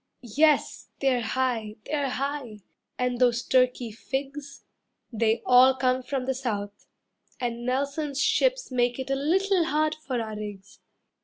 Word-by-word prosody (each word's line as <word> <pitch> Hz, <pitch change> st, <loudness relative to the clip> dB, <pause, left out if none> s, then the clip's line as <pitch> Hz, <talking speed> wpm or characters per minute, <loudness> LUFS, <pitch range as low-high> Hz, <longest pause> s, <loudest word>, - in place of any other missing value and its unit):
Yes, 295 Hz, +7 st, +1 dB
they're 260 Hz, -3 st, +2 dB
high, 230 Hz, -3 st, -1 dB
they're 285 Hz, -3 st, -1 dB
high, 260 Hz, -5 st, -4 dB, 0.4 s
and 250 Hz, -1 st, -1 dB
those 240 Hz, -1 st, +3 dB
Turkey 250 Hz, -2 st, +2 dB
figs, 275 Hz, +5 st, -6 dB, 0.5 s
They 225 Hz, +1 st, +1 dB
all 255 Hz, +1 st, +6 dB
come 255 Hz, -1 st, +1 dB
from 255 Hz, 0 st, -3 dB
the 265 Hz, -, 0 dB
South, 210 Hz, -6 st, -5 dB, 0.5 s
and 240 Hz, -1 st, -3 dB
Nelson's 280 Hz, +2 st, -1 dB
ships -, -, +1 dB
Make 245 Hz, -1 st, +1 dB
it 265 Hz, 0 st, -4 dB
a -, -, +2 dB
little 360 Hz, +5 st, +2 dB
hard 310 Hz, 0 st, +1 dB
for 270 Hz, -6 st, -4 dB
our 220 Hz, -2 st, -4 dB
rigs. 205 Hz, -2 st, -8 dB
255 Hz, 140 wpm, -26 LUFS, 235-280 Hz, 0.5 s, all